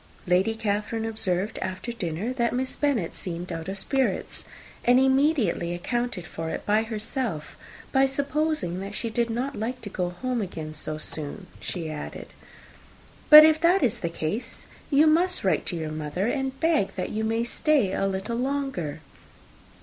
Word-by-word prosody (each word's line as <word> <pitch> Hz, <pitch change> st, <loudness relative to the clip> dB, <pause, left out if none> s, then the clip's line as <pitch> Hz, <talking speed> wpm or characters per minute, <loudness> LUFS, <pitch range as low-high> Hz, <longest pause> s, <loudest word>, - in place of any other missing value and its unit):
Lady 185 Hz, +5 st, +2 dB
Catherine 220 Hz, +1 st, -1 dB
observed, 210 Hz, -2 st, -1 dB
after 185 Hz, +5 st, -4 dB
dinner, 195 Hz, +2 st, -3 dB
that 235 Hz, -2 st, 0 dB
Miss 255 Hz, +1 st, -1 dB
Bennet 265 Hz, -, 0 dB
seemed 175 Hz, 0 st, -5 dB
out 165 Hz, +3 st, -4 dB
of 195 Hz, -, -3 dB
spirits; 265 Hz, +6 st, -1 dB, 0.4 s
and 245 Hz, +1 st, +5 dB
immediately 265 Hz, -, +2 dB
accounting 240 Hz, +1 st, -2 dB
for 165 Hz, -1 st, -5 dB
it -, -, -4 dB, 0.2 s
herself, 220 Hz, -, -3 dB, 0.4 s
by 270 Hz, 0 st, +4 dB
supposing 285 Hz, -, -1 dB
that 200 Hz, +2 st, -6 dB
she 230 Hz, -, -3 dB
did 235 Hz, +1 st, +1 dB
not 250 Hz, +5 st, -2 dB
like 245 Hz, +4 st, -3 dB
to 205 Hz, -, -7 dB
go 180 Hz, -2 st, -1 dB
home 245 Hz, +7 st, -2 dB
again 160 Hz, -5 st, -5 dB
so 155 Hz, 0 st, -3 dB
soon, 155 Hz, +5 st, -4 dB
she 170 Hz, -3 st, -5 dB
added, 150 Hz, -1 st, -7 dB, 1.0 s
"But 305 Hz, 0 st, +12 dB
if 315 Hz, 0 st, +4 dB
that 355 Hz, +3 st, +4 dB
is 240 Hz, -1 st, +1 dB
the 170 Hz, -, -2 dB
case, 210 Hz, +10 st, -4 dB, 0.2 s
you 295 Hz, +1 st, +5 dB
must 345 Hz, +4 st, +3 dB
write 190 Hz, -, +1 dB
to -, -, 0 dB
your 160 Hz, -2 st, -3 dB
mother 155 Hz, +6 st, -2 dB
to 270 Hz, -2 st, -1 dB
beg 320 Hz, -11 st, +2 dB
that 185 Hz, -, -3 dB
you 220 Hz, +1 st, -2 dB
may 225 Hz, +1 st, +1 dB
stay 240 Hz, -4 st, +1 dB
a 195 Hz, -, +1 dB
little 195 Hz, +5 st, -2 dB
longer. 255 Hz, -, -2 dB
225 Hz, 165 wpm, -26 LUFS, 180-265 Hz, 1.0 s, But